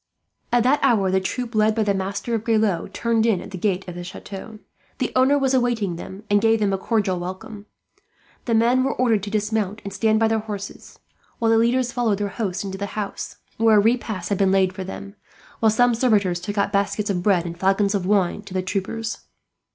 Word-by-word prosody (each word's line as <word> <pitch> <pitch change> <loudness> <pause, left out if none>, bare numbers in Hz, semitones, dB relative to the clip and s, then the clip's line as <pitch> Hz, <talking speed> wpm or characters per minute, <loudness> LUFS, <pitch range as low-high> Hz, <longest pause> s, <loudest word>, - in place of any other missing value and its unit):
At 240 -1 +3
that 265 +4 +3
hour 195 -5 +3
the 190 0 +2
troop, 240 +5 -4
led 215 0 +3
by 225 - +1
the 205 -1 +1
Master 195 +5 -3
of 225 -2 -1
Grelot, 220 -6 +1
turned 230 -1 0
in 210 -6 +2
at 200 - -10
the - - -6
gate 190 -1 -1
of 180 - -6
the 175 0 -7
chateau. 195 +4 -9 0.4
The 255 - -1
owner 260 +3 +4
was 270 -2 +1
awaiting 240 -8 +1
them, 190 +4 -9
and 205 0 +3
gave 225 0 +3
them 200 -2 +1
a - - +1
cordial 200 -4 0
welcome. 190 +4 -7 0.8
The 230 - +1
men 240 +3 +3
were 270 - -1
ordered 230 -5 +2
to 205 - -5
dismount 210 -1 -1
and 200 - -6
stand 215 +2 +2
by 225 - +3
their 220 0 +1
horses, 205 -2 -8 0.4
while 225 -1 +2
the 225 - +5
leaders 245 +2 +2
followed 235 -4 0
their 205 0 -2
host 195 -3 -3
into 195 -1 -6
the 200 - -3
house, 205 -2 -5 0.2
where 225 -1 +5
a - - +7
repast 220 -4 0
had 200 - -1
been 195 -1 +3
laid 190 -1 +3
out - - -21
for 190 - -3
them; 200 +2 -8 0.4
while 220 - +4
some 245 +3 +3
servitors 210 -7 +2
took 205 +3 -5
out 200 +1 +1
baskets 200 +1 0
of 180 -2 -1
bread 180 -3 +2
and 170 0 -6
flagons 195 +2 +2
of 190 -3 -1
wine 200 -1 +1
to 200 -2 -10
the 185 - 0
troopers. 210 +4 -4
210 Hz, 225 wpm, -22 LUFS, 195-225 Hz, 0.8 s, a